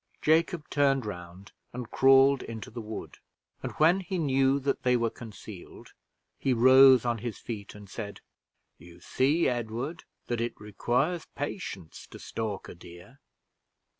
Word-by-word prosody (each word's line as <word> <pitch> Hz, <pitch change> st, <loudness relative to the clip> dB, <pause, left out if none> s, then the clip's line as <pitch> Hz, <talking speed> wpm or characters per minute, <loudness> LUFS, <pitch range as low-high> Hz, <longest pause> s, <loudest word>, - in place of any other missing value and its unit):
Jacob 160 Hz, +1 st, +1 dB
turned 135 Hz, -3 st, +2 dB
round 90 Hz, -1 st, -8 dB, 0.2 s
and 125 Hz, -2 st, -7 dB
crawled 135 Hz, 0 st, +5 dB
into 110 Hz, -3 st, -8 dB
the 115 Hz, +1 st, -6 dB
wood, 110 Hz, 0 st, -8 dB, 0.4 s
and -, -, -5 dB
when 165 Hz, +5 st, +4 dB
he 190 Hz, 0 st, -4 dB
knew 135 Hz, -3 st, +2 dB
that 140 Hz, 0 st, -1 dB
they 125 Hz, -1 st, +3 dB
were 115 Hz, -1 st, 0 dB
concealed, 110 Hz, -4 st, -11 dB, 0.5 s
he 135 Hz, -, +1 dB
rose 130 Hz, +1 st, +7 dB
on 120 Hz, -1 st, 0 dB
his 115 Hz, -2 st, -5 dB
feet 105 Hz, -4 st, -7 dB
and 105 Hz, -1 st, -12 dB
said, 100 Hz, 0 st, -7 dB, 0.6 s
"You 85 Hz, +1 st, -15 dB
see, 140 Hz, -, +1 dB
Edward, 120 Hz, +6 st, -3 dB, 0.2 s
that 120 Hz, -1 st, -2 dB
it 120 Hz, -, -3 dB
requires 125 Hz, -, -1 dB
patience 140 Hz, -, -6 dB
to -, -, -11 dB
stalk 110 Hz, -4 st, -5 dB
a -, -, -9 dB
deer. 85 Hz, +9 st, -14 dB
120 Hz, 145 wpm, -28 LUFS, 105-140 Hz, 0.6 s, rose